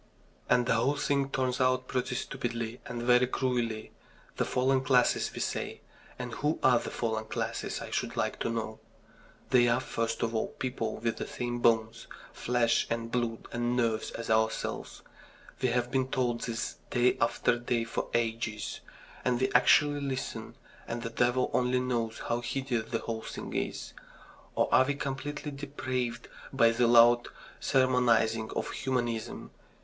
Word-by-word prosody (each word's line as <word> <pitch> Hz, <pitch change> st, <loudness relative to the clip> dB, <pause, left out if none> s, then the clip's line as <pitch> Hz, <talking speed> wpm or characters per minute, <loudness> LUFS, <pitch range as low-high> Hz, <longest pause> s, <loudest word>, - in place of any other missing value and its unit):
And 125 Hz, -1 st, +4 dB
the -, -, +2 dB
whole 120 Hz, +5 st, +2 dB
thing 140 Hz, -1 st, 0 dB
turns 130 Hz, -1 st, 0 dB
out 130 Hz, 0 st, +2 dB
pretty 125 Hz, -1 st, -1 dB
stupidly 120 Hz, -3 st, -3 dB
and 120 Hz, -1 st, -4 dB
very 125 Hz, +1 st, +5 dB
cruelly. 120 Hz, -4 st, -1 dB, 0.5 s
The -, -, +1 dB
fallen 130 Hz, +1 st, +2 dB
classes, 130 Hz, -2 st, +3 dB
we -, -, -7 dB
say. -, -, -3 dB, 0.4 s
And 125 Hz, -1 st, -5 dB
who 150 Hz, +6 st, 0 dB
are 125 Hz, -2 st, +6 dB
the -, -, -5 dB
fallen 110 Hz, -2 st, -2 dB
classes, -, -, -3 dB
I -, -, -7 dB
should -, -, -2 dB
like -, -, -1 dB
to -, -, -1 dB
know? 110 Hz, -1 st, -3 dB, 0.7 s
They 120 Hz, -2 st, +6 dB
are, 120 Hz, +1 st, +3 dB
first 115 Hz, -2 st, -2 dB
of 115 Hz, 0 st, -1 dB
all, 110 Hz, -, 0 dB
people 125 Hz, -4 st, -2 dB
with 115 Hz, -1 st, -1 dB
the -, -, -4 dB
same 120 Hz, -1 st, -3 dB
bones, 115 Hz, -1 st, +2 dB, 0.3 s
flesh, 120 Hz, -1 st, +1 dB
and 115 Hz, 0 st, -2 dB
blood 120 Hz, -2 st, -1 dB
and 120 Hz, +1 st, 0 dB
nerves 115 Hz, -3 st, +1 dB
as 115 Hz, -, -4 dB
ourselves. 110 Hz, 0 st, -1 dB, 0.6 s
We 130 Hz, -, +3 dB
have 120 Hz, 0 st, 0 dB
been 130 Hz, -1 st, +1 dB
told 125 Hz, -3 st, 0 dB
this 115 Hz, -1 st, -3 dB
day 120 Hz, 0 st, +3 dB
after 120 Hz, +1 st, +2 dB
day 120 Hz, -1 st, 0 dB
for 115 Hz, -, -3 dB
ages. 115 Hz, -2 st, -1 dB, 0.4 s
And 125 Hz, -1 st, +1 dB
we 130 Hz, -, +1 dB
actually 145 Hz, +3 st, +5 dB
listen 135 Hz, -2 st, -4 dB, 0.3 s
and 115 Hz, 0 st, -4 dB
the 115 Hz, -, -4 dB
devil 125 Hz, +2 st, +1 dB
only 125 Hz, 0 st, +2 dB
knows 120 Hz, -3 st, -2 dB
how 120 Hz, +1 st, 0 dB
hideous 125 Hz, -2 st, -2 dB
the 115 Hz, -, -1 dB
whole 115 Hz, -1 st, -3 dB
thing -, -, -7 dB
is. -, -, -3 dB, 0.6 s
Or -, -, +3 dB
are 130 Hz, -, +7 dB
we 145 Hz, +1 st, -1 dB
completely 145 Hz, +2 st, -4 dB
depraved 130 Hz, -4 st, -3 dB, 0.2 s
by 115 Hz, -4 st, +5 dB
the 120 Hz, +1 st, +2 dB
loud 120 Hz, 0 st, +6 dB, 0.3 s
sermonising 120 Hz, -4 st, +3 dB
of -, -, -2 dB
humanism? 120 Hz, -4 st, -2 dB
120 Hz, 160 wpm, -30 LUFS, 115-130 Hz, 0.7 s, are